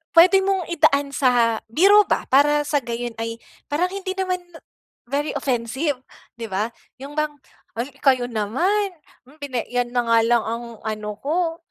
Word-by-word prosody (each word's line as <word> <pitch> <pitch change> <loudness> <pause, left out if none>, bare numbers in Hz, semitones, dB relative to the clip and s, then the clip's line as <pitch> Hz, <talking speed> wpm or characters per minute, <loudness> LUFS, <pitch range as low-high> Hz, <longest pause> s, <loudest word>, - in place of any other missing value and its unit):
puwede 370 +3 +7
mong 385 -3 0
idaan 285 -4 +3
sa 240 -4 +3
biro 400 - +6
ba! - - 0
Para 295 +2 +4
sa 290 - +2
gayon 235 0 -4
ay 230 0 -4 0.3
parang 335 +5 +2
hindi 385 -1 -4
naman 370 -1 0 0.7
very 290 +2 -1
offensive 265 +1 -1 0.4
di 230 - -5
ba? 205 +4 0 0.3
Yung 280 +2 -8
bang, 305 0 +1 0.5
"ay 245 - -1 0.2
kayo 255 -3 +3
naman! 340 - 0 0.5
Pina 260 -5 -3
yan 245 -1 -1
na 245 - +3
nga 230 0 +4
lang 235 -1 +3
ang 230 +2 -4 0.2
ano 215 -1 -4
ko 330 +2 -1
275 Hz, 155 wpm, -22 LUFS, 235-330 Hz, 0.7 s, puwede